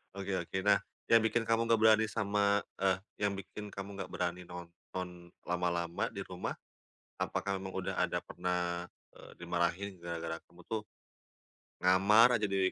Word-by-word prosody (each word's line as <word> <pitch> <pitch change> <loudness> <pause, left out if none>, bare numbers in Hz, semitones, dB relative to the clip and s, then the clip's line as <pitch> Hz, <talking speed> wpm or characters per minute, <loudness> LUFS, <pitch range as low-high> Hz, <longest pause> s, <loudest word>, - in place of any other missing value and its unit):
Oke 100 0 -3
oke. 85 +2 -4
Nah, 100 0 +5 0.3
yang 115 - +9
bikin 115 +1 +2
kamu 115 0 +2
nggak 115 -1 +4
berani 110 0 +6
sama 100 -1 +2 0.2
eh, 95 -1 +3 0.2
yang 100 -1 +1
bikin 100 +2 -7
kamu 100 0 -5
nggak 95 - -5
berani 90 0 -2
nonton 90 0 -8
lama-lama, 85 -1 0
di - - -4
rumah, - - -4 0.7
apakah 100 -1 -1
memang 95 0 -6
udah - - -2
ada - - +1
pernah, 90 -1 -2 0.2
eee, - - -13
dimarahin 85 +2 -1
gara-gara 85 -1 -4
kamu 90 +1 -17
tuh, 110 -1 -2 1.0
ngamar 105 +6 +6
aja, 105 - +1
di 95 -1 +2
95 Hz, 150 wpm, -33 LUFS, 85-105 Hz, 1.0 s, yang